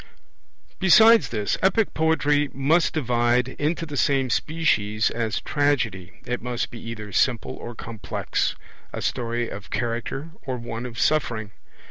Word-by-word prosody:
Besides 220 +4 +7
this, 105 -3 -1
Epic 195 +3 +2
poetry 150 -2 +2
must 155 +5 +2
divide 120 -2 +2
into 160 +3 0
the 145 -2 -7
same 135 -3 +2
species 110 -10 +1
as 115 -2 -1
Tragedy; 120 - 0
it 125 0 -3
must 120 -1 -3
be 115 - -9
either 110 -3 -7
simple 120 +2 +1
or 120 - -8
complex, 110 -1 -3 0.4
a - - -5
story 120 0 -1
of 100 -2 -8
character 120 +6 -3
or 130 -2 -4
one 120 0 -5
of 115 -2 -10
suffering. 120 -9 0
125 Hz, 135 wpm, -24 LUFS, 115-150 Hz, 0.4 s, Besides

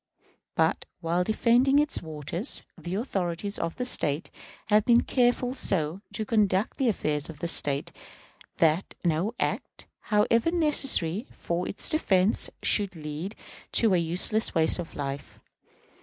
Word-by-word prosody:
But, - - +1 0.2
while 170 +2 0
defending 240 +6 +3
its 295 0 +2
waters, 160 - -3
the 175 +1 -6
authorities 200 -3 -3
of 165 0 -3
the 250 - -3
State 150 - 0 0.4
have 210 0 +4
been 235 +1 +4
careful 245 0 +1
so 180 - 0
to 215 +1 -3
conduct 210 0 +1
the 265 - +2
affairs 150 -7 -2
of 160 - -9
the 170 - -4
State 140 -4 0 0.7
that 165 +3 +1
no 175 +7 0
act, - - -3
however 225 +5 +2
necessary 275 - +4
for 175 +1 -3
its - - -3
defense, 205 - +2
should 200 -3 +2
lead 155 +6 -6 0.4
to 225 -4 +4
a - - +4
useless 180 +7 +1
waste 160 +2 +2
of 170 - -7
life. 140 -1 -6
190 Hz, 140 wpm, -27 LUFS, 165-230 Hz, 0.7 s, have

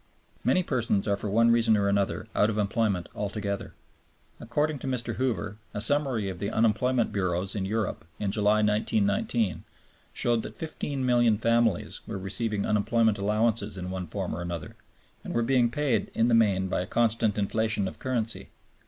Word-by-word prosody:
Many 185 - +3
persons 120 - 0
are 100 - +2
for 100 +1 -4
one 115 +3 +4
reason 115 -2 +4
or 100 -1 +1
another 100 -1 0
out 105 - +3
of 110 - -2
employment 105 -3 0
altogether. 100 -1 -4 0.6
According 145 +5 -1
to 135 - -6
Mr. 125 -3 -2
Hoover, 110 -5 -2 0.2
a - - -1
summary 130 -3 +1
of 95 -2 -5
the 100 - -2
unemployment 115 +2 +2
bureaus 95 -1 -1
in 100 -3 -2
Europe 110 0 -2
in 100 -2 -2
July, 105 +1 +2
1919, 105 -2 +1 0.5
showed 120 -1 +1
that - - -9
15,000,000 125 -8 +1
families 115 -4 +1
were - - -4
receiving 100 +2 -2
unemployment 110 0 +2
allowances 105 0 +1
in 90 0 -5
one 95 -1 -4
form - - -4
or 85 - -5
another, 85 -3 -5 0.5
and - - -5
were 120 - +2
being 125 -1 +3
paid 125 -5 0
in 115 +2 +3
the - - +3
main 100 -5 +3
by 90 - -1
a 90 - -5
constant 115 -2 +1
inflation 105 0 0
of - - -7
currency. 120 -4 -2
110 Hz, 170 wpm, -27 LUFS, 100-115 Hz, 0.6 s, one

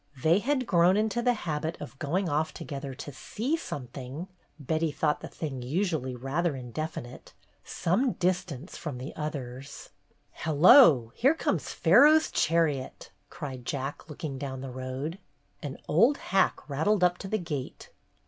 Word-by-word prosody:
They 165 +4 +5
had 260 +2 0
grown 180 -1 +4
into 220 +2 0
the 245 0 +2
habit 160 0 -2
of 145 -2 -9
going 175 +6 0
off 155 +1 -1
together 140 -2 -6
"to 145 +2 -7
see 250 - -2
something" 140 - -6 0.2
— - - -40
Betty 155 +3 0
thought 150 0 0
the - - -6
thing 140 -5 -5
usually 145 -2 -1
rather 140 +6 -1
indefinite 130 0 -6 0.2
— - - -40
some 235 +9 0
distance 180 -4 -2
from 150 -6 -5
the 130 +3 -7
others. 140 -3 -6 0.4
"Hello! 155 - +6
Here 275 +6 +3
comes - - -1
Pharaoh's 310 +2 +5
chariot!" 155 -5 0 0.2
cried 135 -7 -7
Jack, 140 +5 -4
looking 145 -2 -5
down 130 -2 -5
the 135 -1 -6
road. 130 +7 -5 0.4
An 145 -4 -6
old 230 - +4
hack 195 -1 0
rattled 165 +8 +1
up 180 0 +3
to 195 - -6
the 215 - 0
gate. 155 -8 -6
155 Hz, 150 wpm, -28 LUFS, 135-185 Hz, 0.4 s, Hello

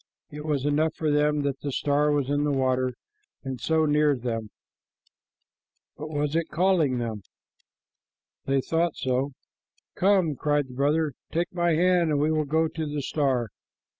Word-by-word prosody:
It 150 +1 -8
was 145 -3 -1
enough 155 +2 +1
for 155 -2 0
them 150 0 +2
that 140 -1 -2
the 145 - -3
star 145 +2 +1
was 145 -3 +1
in 145 +1 +1
the 150 - +1
water 130 -2 0 0.5
and 130 -2 -5
so 160 -1 +2
near 150 -1 +3
them. 115 -3 -4 1.5
But 155 +1 -7
was 150 0 -1
it 165 0 +1
calling 165 -6 +2
them? 115 -3 -3 1.2
They 135 0 +1
thought 165 +3 0
so. 130 +2 -1 0.6
"Come," 185 -5 +2
cried 145 -1 0
the - - -10
brother, 145 +3 +1 0.2
"take 170 +2 -1
my 175 -2 +2
hand, 175 0 +3
and 150 -2 +1
we 150 +2 +2
will 155 -1 +1
go 160 +3 +1
to 160 0 -4
the 145 -1 -3
star." 130 -6 0
150 Hz, 165 wpm, -26 LUFS, 135-160 Hz, 1.5 s, near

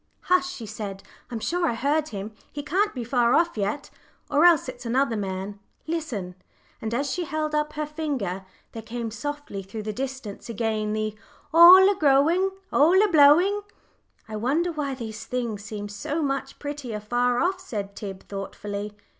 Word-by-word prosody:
"Hush!" 360 0 +2
she 240 -11 -7
said; 200 -2 -6 0.3
"I'm 235 - -4
sure 345 +8 0
I 235 - 0
heard 290 +5 +1
him. 205 -2 -6 0.2
He 290 - -5
can't 380 +8 +1
be 245 - -3
far 240 0 +2
off 340 0 +2
yet, 210 +7 -2 0.4
or 295 +3 +5
else 335 -6 +5
it's 250 -1 -7
another 250 +1 +1
man. 195 0 -4 0.3
Listen." 270 - -3 0.5
And 220 - -3
as 275 +3 -1
she 355 - -2
held 310 -1 -2
up 300 0 0
her 305 0 -2
finger 280 - -3 0.3
there 225 - -7
came 230 +1 -5
softly 290 -3 -5
through 205 +3 -7
the 215 0 -3
distance 260 -4 -6
again 220 -2 -1
the 215 0 -2 0.4
"All 360 +3 +10
a 405 - +4
growing, 325 +3 +3 0.2
all 335 +6 +5
a - - +4
blowing." 340 +6 +6 0.7
"I 215 -1 -5
wonder 295 +10 +1
why 290 -4 -3
things 225 -2 -4
seem 205 -1 -6
so 205 +10 -3
much 275 -1 -2
prettier 285 -7 -5
far 240 +3 +1
off," 370 +2 +1
said 205 - -5
Tib, 195 -2 -7
thoughtfully. 205 +1 -5
255 Hz, 170 wpm, -25 LUFS, 215-305 Hz, 0.7 s, All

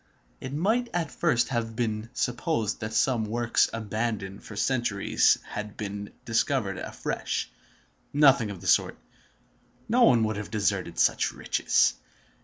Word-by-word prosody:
It 130 - -6
might 220 - +1
at 165 -6 -1
first 120 -1 +1
have 115 -3 -2
been 110 -2 -2
supposed 120 - -1
that 110 0 -4
some 125 -4 +2
works 115 +2 +1
abandoned 110 -2 -3
for 105 - -10
centuries 110 -2 +2
had 105 0 -6
been 100 -1 -5
discovered 115 -3 0
afresh. - - -3 0.6
Nothing 135 -6 +5
of 95 -4 -7
the 95 - -7
sort. - - +3 0.9
No 245 +3 +2
one 120 - +6
would 110 -1 -1
have 105 - -5
deserted 100 -5 -1
such - - +2
riches. - - +2
115 Hz, 135 wpm, -27 LUFS, 105-130 Hz, 0.9 s, one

